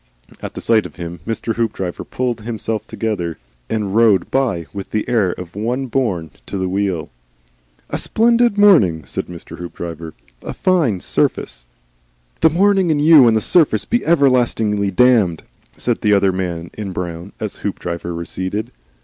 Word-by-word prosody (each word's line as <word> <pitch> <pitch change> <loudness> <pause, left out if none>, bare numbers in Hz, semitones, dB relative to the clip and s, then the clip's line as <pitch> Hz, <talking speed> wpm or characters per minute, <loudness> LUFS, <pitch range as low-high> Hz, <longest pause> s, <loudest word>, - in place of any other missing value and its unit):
At - - -7
the - - -5
sight 110 -2 +2
of - - -19
him 85 -1 -7
Mr. 115 0 -3
Hoopdriver 105 -6 -2
pulled 125 -3 -2
himself 110 -1 -4
together, 90 -7 -3 0.3
and 105 -3 -2
rode 110 -6 +4
by 120 -11 0
with 100 -1 -6
the 110 - -2
air 115 -7 +2
of 90 0 -10
one 120 +6 -2
born 100 - -1 0.2
to - - -4
the 95 0 -1
wheel. 95 -3 -2 0.8
"A - - -1
splendid 235 -1 +3
morning," 105 - +5
said - - -4
Mr. 85 -1 -10
Hoopdriver, 85 -2 -7 0.3
"and - - -9
a - - -5
fine 160 - +1
surface." - - -1 0.7
"The 160 - +5
morning 190 +2 +3
and 155 -2 +2
you 150 -4 +7
and 110 -1 +4
the - - 0
surface 165 - +3
be 240 0 0
everlastingly 120 -9 +2
damned!" 105 -5 +3 0.3
said - - -1
the 105 -1 +4
other 100 -1 +3
man 85 -2 -4
in 100 -3 -6
brown 85 +1 -5
as 110 -2 -4
Hoopdriver 85 -3 -4
receded. 95 +6 -4
105 Hz, 160 wpm, -18 LUFS, 90-125 Hz, 0.8 s, you